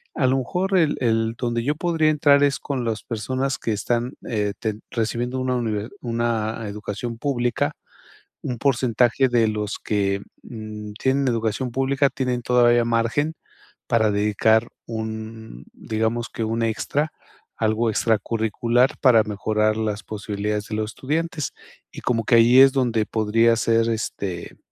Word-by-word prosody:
A 130 -4 +2
lo 130 +1 +2
mejor 185 +9 0
el 160 -4 +3
el 115 -1 +1
donde 120 -1 -1
yo 145 +3 0
podría 160 -2 +1
entrar 145 -2 +4
es 140 -1 +2
con 130 -4 -3
las 110 -2 -2
personas 130 +5 -2
que 110 - -1
están, 120 +4 -1 0.2
eh, 105 -3 -1
ten 110 -2 -3
recibiendo 120 +3 -2
una 130 0 0
univer 110 -2 -2
una 115 -2 -1
educación 110 +3 -5
pública, 120 -3 0 0.7
un 125 - -3
porcentaje 125 0 +2
de 115 -2 +3
los 105 -1 -3
que, 100 -1 0 0.2
mm 105 -2 -8
,tienen 135 0 +2
educación 115 +1 -1
pública 135 +2 +2
tienen 125 -2 -2
todavía 120 -1 +4
margen 120 +7 0 0.5
para 110 -2 +3
dedicar 105 +2 +2 0.2
un, 110 - -6
digamos 110 +2 -2
que 115 - -4
un 115 +1 -1
extra. 140 +7 -1 0.5
Algo 110 +1 +1
extracurricular 115 +3 +1
para 120 -5 +5
mejorar 110 +1 0
las 105 -1 -2
posibilidades 105 0 -3
de 110 - -4
los 110 0 -2
estudiantes. 155 +2 -2 0.4
Y - - -8
como 115 -3 0
que 120 - +2
ahí 120 +3 +7
es 135 0 +8
donde 120 -5 +1
podría 115 +1 +2
ser, 115 +1 +2
este, 100 -5 -4
115 Hz, 145 wpm, -23 LUFS, 110-130 Hz, 0.7 s, es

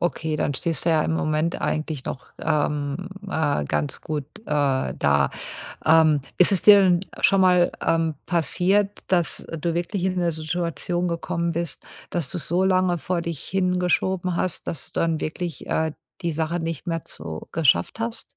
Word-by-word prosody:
Okay, 160 -2 -1
dann 145 - -1
stehst 165 +2 -1
du 170 - +3
ja 155 -1 +3
im - - 0
Moment 155 +1 0
eigentlich 155 -3 -2
noch, 130 - -6
ähm, 150 +2 -1 0.2
äh, 145 - 0
ganz 75 0 -2
gut, 150 -3 -3 0.2
äh, - - -25 0.5
da. 70 -1 +3 0.5
Ähm, 155 -2 +5 0.2
ist 180 - +7
es 185 - +3
dir 205 -1 +9
denn 180 -2 +4 0.2
schon 195 -1 +4
mal, 180 -1 +5
ähm, 165 -1 +1
passiert, 190 +4 +2
dass, 175 -6 +1
äh, 165 - -7
du 170 +2 -1
wirklich 175 +2 -2
in 185 -1 0
'ne 170 -1 +1
Situation 175 +2 -2
gekommen 170 0 -2
bist, 170 0 -3 0.3
dass 170 -5 -1
du's 175 - -4
so 180 +3 +2
lange 185 -2 +2
vor 175 +4 -1
dich 165 -4 -4
hingeschoben 180 -1 0
hast, 185 - -2
dass 160 - -4
du - - -4
dann 165 -1 +1
wirklich, 165 -1 -4
äh, 160 -1 0 0.3
die 170 -1 0
Sache 160 +2 -1
nicht 165 0 -4
mehr 165 -1 -2
zu 80 0 -7
geschafft 165 +7 +2
hast? 230 0 -3
170 Hz, 175 wpm, -24 LUFS, 155-180 Hz, 0.5 s, dir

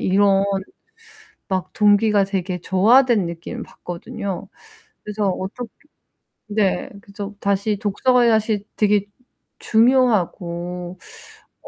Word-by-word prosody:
이런 195 +1 +3 1.1
막 190 -2 -2
동기가 210 -1 +4
되게 185 -2 -3
저하된 220 +3 +4
느낌을 170 0 -6
받거든요. 200 +1 -6 0.6
그래서 210 -1 -1
어떻게 200 +6 -5 0.8
네. 205 -2 0
그래서 205 -1 -8
다시 200 +1 0
독서가 240 +4 +2
사실 215 -2 +1
되게 205 -1 +2 0.5
중요하고 180 -7 +1 0.7
어 - - -12
205 Hz, 215 characters per minute, -21 LUFS, 190-220 Hz, 1.1 s, 동기가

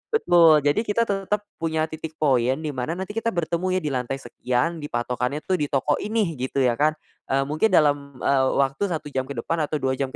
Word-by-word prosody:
Betul, 165 - +5
jadi 145 +4 +2
kita 225 +1 +1
tetep 200 -1 -1 0.2
punya 160 -1 0
titik 160 0 -7
point, 130 -4 +2
di 155 - -2
mana 135 +4 -3
nanti 190 +2 -5
kita 225 -1 -2
bertemu 170 +2 -1
ya - - +2
di 150 - -1
lantai 125 0 -2
sekian, 135 +4 -2
di 145 - -5
patokannya 125 +3 -2
tuh 185 -1 0
di 150 - 0
toko 140 +1 0
ini, 210 - -1
gitu 130 +1 0
ya, 120 -1 +1
kan. 155 +1 +3 0.3
Eee, 135 +1 +1
mungkin 150 +9 +1
dalam, 145 -7 +2
eee, 135 -1 +3
waktu 140 +8 +1
1 160 -5 -4
jam 130 -1 -2
ke 140 - -6
depan 165 - -2
atau 155 - -3
2 135 -3 0
jam 135 - 0
150 Hz, 220 wpm, -24 LUFS, 135-175 Hz, 0.3 s, Betul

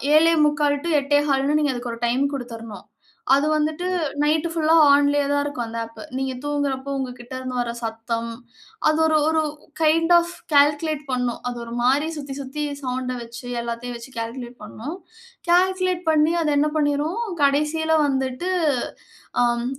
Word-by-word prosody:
7:45 300 -3 +3
two - - -1
8:15ன்னு 290 0 +2
நீங்க 290 -3 +1
அதுக்கு 245 -1 -4
ஒரு 230 - -10
டைம் 255 +4 +1
குடுத்துறணும். 230 -6 -8 0.5
அது 280 +2 +3
வந்துட்டு 310 +3 -1 0.4
நைட்டு 310 +2 +1
ஃபுல்லா 320 -1 +3 0.2
ஆன்லேயே 285 0 +4
தான் 285 0 +2
இருக்கும் 285 -5 -3
அந்த 230 0 -6
ஆப். 230 - -15 0.2
நீங்க 265 0 -2
தூங்குறப்போ 280 -2 -2
உங்ககிட்டேருந்து 255 0 -5
வர்ற 235 -1 -1
சத்தம் 230 0 -3 0.6
அது 310 0 +3
ஒரு 315 -1 +3
ஒரு 320 0 +2 0.4
கைண்ட் 330 +2 +3
ஆஃப் 345 0 0 0.2
கால்குலேட் 295 +1 +3
பண்ணும். 250 -1 -1
அது 245 -1 -4
ஒரு 230 - -8
மாரி 270 +5 +3
சுத்தி 280 -2 -6
சுத்தி 275 +3 -4 0.2
சவுண்ட 255 -1 -3
வச்சு, 235 +1 -9 0.2
எல்லாத்தையும் 235 +1 -5
வச்சு 235 +3 -11
கால்குலேட் 240 +1 -6
பண்ணும். 245 +9 -7 0.5
கால்குலேட் 370 0 +2
பண்ணி 310 +1 +3
அது 305 -2 +1
என்ன 300 +1 +3
பண்ணீரும், 300 +7 0 0.2
கடைசியில 305 +3 +2
வந்துட்டு 265 +5 -1 0.9
அம் 240 0 +1
285 Hz, 145 wpm, -23 LUFS, 245-305 Hz, 0.9 s, ஆன்லேயே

